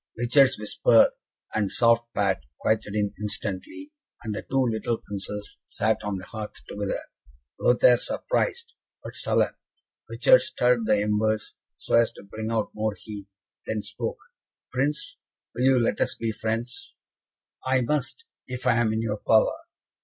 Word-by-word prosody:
Richard's 130 +3 +4
whisper 110 +2 +4 0.4
and 105 -3 0
soft 115 0 +3
pat 100 -3 +2 0.2
quieted 105 -1 0
him 105 -1 +1
instantly, 105 - -4 0.3
and 110 -2 -3
the 105 - -4
two 135 -1 +1
little 115 0 -1
Princes 105 0 -6
sat 110 +1 0
on 105 -1 -2
the 90 - -8
hearth 110 0 -6
together, 100 -1 -2 0.6
Lothaire 120 0 +5
surprised, 480 -1 -1 0.3
but - - -7
sullen. - - +1 0.6
Richard - - +5
stirred 120 -2 +1
the 105 - +4
embers, 105 0 0 0.2
so - - -6
as 115 0 +5
to - - -13
bring 110 +2 -5
out 115 -2 -1
more 105 -1 -1
heat, 105 -2 -8 0.4
then 110 -1 -2
spoke: - - -4 0.5
"Prince, 150 - -1 0.4
will 125 - 0
you 135 -1 +5
let 115 - 0
us - - +1
be 115 -1 -2
friends?" 115 +3 -4 0.7
"I 130 0 +2
must, 150 - -1 0.2
if 125 -1 -6
I 120 -2 +4
am 120 -2 +2
in 110 +1 -1
your 110 -1 -1
power." 110 +1 +4
110 Hz, 150 wpm, -26 LUFS, 105-125 Hz, 0.7 s, Lothaire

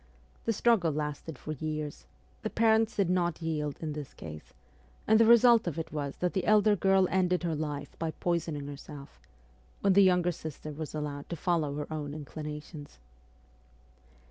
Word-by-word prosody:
The - - +2
struggle 205 -7 +3
lasted 150 0 -4
for 155 - -7
years; 155 - -4 0.3
the - - -2
parents 225 0 +3
did 200 -3 +2
not 175 -2 0
yield 150 -3 -2
in 155 -2 -3
this 150 -3 -7
case, 75 -2 -9 0.5
and 220 0 +5
the 230 - +6
result 235 -2 +6
of 170 - -2
it 165 - -5
was 145 -2 -3
that 180 -1 -1
the 190 -3 -1
elder 215 0 +5
girl 195 0 +3
ended 180 -1 +2
her 170 -2 0
life 145 -2 -4
by 165 - -1
poisoning 160 -3 -2
herself, 140 0 -10 0.6
when 195 - +4
her 200 - +6
younger 180 -2 +4
sister 155 -2 -7
was 155 +1 -6
allowed 145 -1 -5
to 170 - -3
follow 160 -3 0
her 150 +1 -5
own 145 -1 -4
inclinations. 150 0 -8
160 Hz, 170 wpm, -30 LUFS, 150-185 Hz, 0.6 s, the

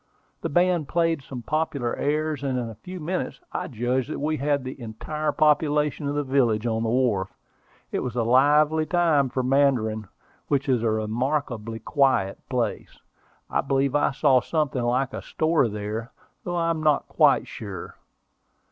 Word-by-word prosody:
The - - -2
band 175 -1 +2
played 165 -2 +1
some 130 -2 -8
popular 145 -5 -1
airs, 155 0 -1
and 135 -2 -1
in 120 -2 -3
a 110 0 -15
few 185 0 -7
minutes 175 +4 -3
I - - -3
judged 125 +1 -1
that - - -3
we 155 +2 -1
had 145 -1 0
the 130 0 -7
entire 150 +7 -3
population 150 -1 +2
of 145 - -2
the 145 - 0
village 120 -5 +1
on 110 -1 0
the 115 - 0
wharf. 115 -6 0 0.5
It - - -1
was 125 -2 -4
a 120 - +1
lively 150 +6 +4
time 165 -6 +3
for 130 +1 -2
Mandarin, 125 -6 +2 0.4
which 140 0 0
is 125 -4 +2
a 115 - +1
remarkably 115 +1 -2
quiet 130 -7 +1
place. - - -2 0.5
I - - 0
believe 135 0 0
I 145 - +3
saw 135 -2 +3
something 150 -4 -1
like 125 +2 0
a - - -4
store 155 -5 +1
there, 105 +2 -5 0.3
though 175 - -3
I 165 -1 +1
am 160 -1 -2
not 150 -2 +2
quite - - +4
sure. - - -8
135 Hz, 170 wpm, -25 LUFS, 120-150 Hz, 0.5 s, lively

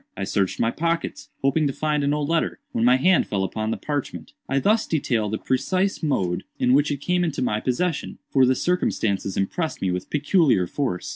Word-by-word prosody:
I 100 - -3
searched 95 -1 -1
my 115 - +2
pockets, 165 +3 -2
hoping 145 +3 +2
to 135 - -2
find 150 0 0
an 140 - +1
old 150 -1 -1
letter, 165 0 0
when 115 - -1
my 125 +2 +5
hand 180 +7 +3
fell 100 -2 -1
upon 110 +3 -2
the - - -1
parchment. 140 - -4 0.2
I 135 - +1
thus 215 +10 +2
detail 120 -9 0
the 110 - -2
precise 185 - 0
mode 95 - 0
in 125 - +2
which 145 +2 +4
it 145 -1 -3
came 180 +3 +1
into 160 -6 -1
my 105 -3 0
possession; 150 +8 -2
for 135 - +4
the 130 - +3
circumstances 105 - 0
impressed 155 - -2
me 95 - 0
with 90 0 -4
peculiar 150 - +3
force. 90 -2 -3
135 Hz, 205 wpm, -23 LUFS, 110-160 Hz, 0.2 s, my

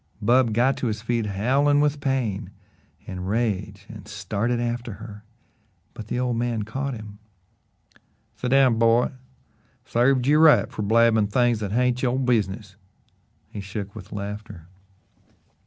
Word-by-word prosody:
Bub 120 +2 +3
got 125 +5 +2
to 125 - -2
his 110 -1 -3
feet 115 -2 -1
howling 135 +9 +2
with 145 0 +1
pain 130 -8 -1 0.6
and 90 0 -6
rage 105 -3 -2
and 105 -2 -11
started 110 +3 -2
after 120 -1 -3
her, 105 0 -11 0.7
but 105 - -9
the 120 - -2
old 125 -2 -1
man 115 -2 -1
caught 135 +5 -4
him: 105 -2 -10 1.2
"Set 125 - -3
down, 130 -3 +4
boy! 115 +1 +3 0.7
Sarved 125 +1 +2
you 150 +3 +4
right 155 -7 +5
fer 125 - -5
blabbin' 110 0 +3
things 120 +1 +2
that 105 -2 -4
hain't 125 +1 +1
yo' 125 -1 +1
business." 105 -6 -1 0.7
He 105 - -6
shook 100 0 -6
with 105 -2 -11
laughter. 105 -3 -7
115 Hz, 140 wpm, -24 LUFS, 105-125 Hz, 1.2 s, right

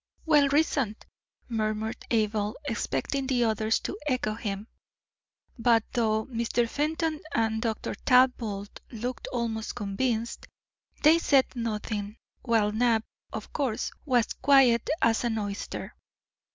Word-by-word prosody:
"Well 295 -3 +5
reasoned!" 275 -7 +1 0.4
murmured 220 -1 -2
Abel, 215 -1 0
expecting 275 -1 -2
the 250 -3 +2
others 220 0 +1
to 400 - -5
echo 255 -6 0
him. 205 -2 -4 0.9
But, 230 -1 +4
though 220 -3 +1
Mr. 235 -1 0
Fenton 310 +4 -1
and 220 -1 +1
Dr. 225 -2 -2
Talbot 230 -4 +2
looked 245 +2 -5
almost 225 -2 -2
convinced, 225 +3 -2 0.6
they 315 +3 +7
said 275 -5 +3
nothing, 215 -2 -3 0.2
while 225 -4 +2
Knapp, 225 0 +2 0.3
of - - -7
course, 265 -7 -1
was 245 -5 +1
quiet 260 -4 +4
as 230 0 +3
an 230 -2 0
oyster. 205 -1 -4
230 Hz, 115 wpm, -28 LUFS, 215-260 Hz, 0.9 s, they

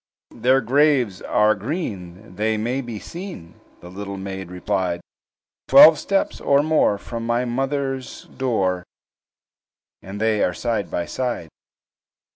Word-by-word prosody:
"Their 130 +3 +3
graves 130 -5 +2
are 105 0 +3
green, 100 - -6
they 110 +2 0
may 120 +5 -1
be 120 -4 -7
seen," 170 - -9 0.2
The 90 - -11
little 100 +1 -6
maid 95 -1 -6
replied; 90 -1 -2 0.7
"Twelve 155 -1 +9
steps 195 -1 -1
or 140 +1 +3
more 155 -9 +2
from 115 +3 -6
my 120 +2 0
mother's 135 +1 -3
door, 95 -9 -1 1.2
And 95 +2 -8
they 110 -1 +2
are 90 - 0
side 115 -5 -2
by 85 - -2
side. 120 -10 -3
110 Hz, 125 wpm, -22 LUFS, 95-135 Hz, 1.2 s, Twelve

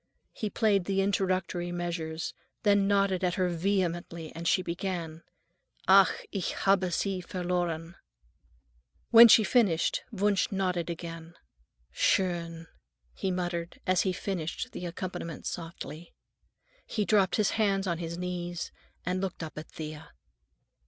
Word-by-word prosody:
He 215 - -3
played 205 -4 +2
the 195 0 0
introductory 185 -3 0
measures, 170 -2 -3 0.3
then 200 -2 +4
nodded 195 -2 +2
at 180 -1 +1
her 185 -1 +1
vehemently, 175 -2 -1
and 170 +1 -4
she 185 - +3
began:— 170 -2 -4 0.7
"Ach, 195 0 +8 0.2
ich 195 -3 -2
habe 195 -2 +2
sie 190 +1 -1
verloren." 175 -2 -2 1.2
When 235 0 +11
she 220 0 +7
finished, 200 -7 +2
Wunsch 205 -1 +1
nodded 180 -3 -1
again. 165 0 -7 0.6
"Schön," 170 -3 +1 0.5
he 190 - -2
muttered 175 -2 -3
as 185 -1 +3
he 190 - +1
finished 180 -3 -3
the 180 - -5
accompaniment 170 -2 -6
softly. 165 -1 -7 0.7
He 210 -3 -1
dropped 200 -3 +3
his 210 -2 +2
hands 200 -3 +1
on 170 -3 -1
his 170 0 -4
knees 175 -1 -4 0.3
and 180 +1 -1
looked 190 -3 -3
up 155 -3 -7
at 155 +1 -8
Thea. 155 0 -8
180 Hz, 130 wpm, -29 LUFS, 170-195 Hz, 1.2 s, When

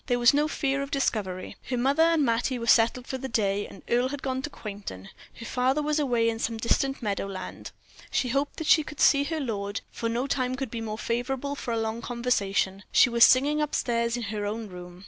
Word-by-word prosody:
There 245 -2 +2
was 240 +1 +5
no 295 +1 +2
fear 275 -3 -1
of 280 - -4
discovery. 200 -9 -2
Her 250 - 0
mother 275 +6 +2
and 325 -3 +4
Mattie 240 +2 0
were 230 - -4
settled 235 +2 +4
for 265 - -4
the 265 0 -5
day, 205 -3 0 0.2
Earle 245 +2 +2
had 285 0 -6
gone 260 -1 -1
to 300 - -4
Quainton, 200 - -8 0.3
her 230 - -9
father 260 +5 +1
was 300 +1 +1
away 240 -5 +2
in 225 0 -1
some 225 0 -2
distant 270 +4 0
meadow 200 -2 -1
land. 190 -1 -7 0.4
She 250 - 0
hoped 275 +3 -1
that 320 - -4
she 310 - +6
could 300 -1 -9
see 280 0 +5
her 320 +2 -2
lord, 205 -6 -3
for 230 - -3
no 240 +3 -1
time 255 -2 -1
could 265 -3 -4
be 230 - -4
more 215 -1 -4
favorable 250 +5 -2
for 265 -4 -5
a 230 - 0
long 225 +1 -2
conversation. 200 -6 0
She 250 - +5
was 235 0 +5
singing 290 +4 +5
up 300 - -1
stairs 235 0 0
in 240 - -4
her 210 -1 -3
own 220 +1 -4
room. 180 -1 -10
240 Hz, 225 wpm, -27 LUFS, 220-275 Hz, 0.4 s, she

